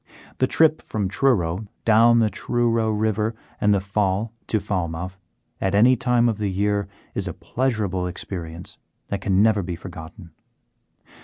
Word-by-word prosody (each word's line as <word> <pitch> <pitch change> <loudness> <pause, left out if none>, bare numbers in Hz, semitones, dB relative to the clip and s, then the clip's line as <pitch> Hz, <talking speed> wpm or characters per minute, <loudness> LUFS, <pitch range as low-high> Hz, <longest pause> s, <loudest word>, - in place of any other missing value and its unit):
The 130 - +3
trip 155 +2 +3
from 105 -3 -3
Truro 100 -5 +1 0.2
down 115 +1 +6
the 110 -2 +3
Truro 115 -2 0
river 110 +1 0 0.3
and 105 0 +4
the 100 - +4
Fal 100 +2 -1
to 110 - +1
Falmouth 90 -1 -3 0.4
at 95 +1 +1
any 120 +5 +6
time 120 0 +2
of 110 -3 -1
the 105 -2 0
year 100 +1 0 0.3
is - - -2
a - - -3
pleasurable 105 -8 -1
experience 85 -2 -6 0.3
that 100 -1 -3
can 95 +1 +3
never 110 -2 +3
be 90 -1 -4
forgotten. 85 -1 -10
105 Hz, 150 wpm, -23 LUFS, 95-115 Hz, 0.4 s, down